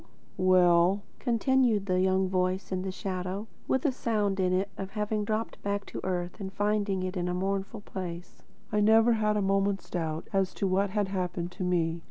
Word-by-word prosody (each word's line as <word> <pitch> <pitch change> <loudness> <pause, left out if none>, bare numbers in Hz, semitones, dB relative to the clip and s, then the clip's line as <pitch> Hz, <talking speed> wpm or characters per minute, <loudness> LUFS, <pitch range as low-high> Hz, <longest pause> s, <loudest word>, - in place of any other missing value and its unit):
"Well," 185 +1 +4 0.2
continued 240 -3 +2
the 185 -2 +1
young 190 0 +2
voice 185 +1 -1
in 185 -1 -1
the 190 0 -3
shadow, 185 +1 -4 0.2
with 265 +2 +1
a 290 - +4
sound 210 -6 0
in 185 -1 +2
it 185 +2 +1
of 195 -1 -5
having 210 +1 -1
dropped 215 +2 -3
back 200 0 -2
to - - -7
earth 180 -1 -3
and 190 -1 -5
finding 205 -1 0
it 185 +1 -3
a 180 - -1
mournful 195 +3 -2
place; 180 -3 -7 0.3
"I 210 - +2
never 220 +3 +5
had 210 -1 +1
a 205 - +1
moment's 195 0 0
doubt 160 -3 -3
as 195 -1 +1
to - - -1
what 195 +1 +2
had 205 0 0
happened 180 -2 -2
to 185 +1 -5
me. 170 -2 +1
195 Hz, 190 wpm, -29 LUFS, 185-210 Hz, 0.3 s, never